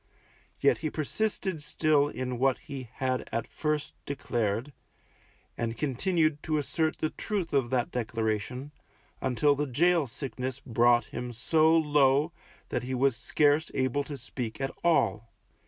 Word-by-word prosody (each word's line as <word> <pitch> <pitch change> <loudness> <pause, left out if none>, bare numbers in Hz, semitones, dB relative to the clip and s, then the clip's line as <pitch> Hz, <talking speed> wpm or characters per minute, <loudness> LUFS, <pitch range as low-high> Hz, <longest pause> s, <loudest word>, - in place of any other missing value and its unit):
Yet - - +3
he 155 - -2
persisted 185 +2 -2
still 150 -1 +2
in 125 -4 -4
what 135 -1 +3
he 130 -4 -8
had 130 -1 -1
at 115 0 -1
first 150 -1 -2
declared, 120 -1 -1 0.8
and 115 -1 -3
continued 155 +2 +1
to 155 -1 0
assert 160 +2 0
the 155 - -1
truth 195 -7 -3
of 135 -4 +2
that 125 -2 0
declaration, 115 +3 -2 0.5
until 135 +3 +3
the 145 +1 -1
gaol 165 +3 +3
sickness 130 0 -4
brought 120 -2 +3
him 125 0 -4
so 160 +7 +3
low, 145 0 +3 0.4
that 120 - -1
he 130 +1 -3
was 135 -1 +3
scarce 150 +6 +2
able 130 +1 +1
to 145 -1 -6
speak 120 -2 -5
at 135 0 -1
all. 115 - +2
135 Hz, 140 wpm, -29 LUFS, 125-155 Hz, 0.8 s, Yet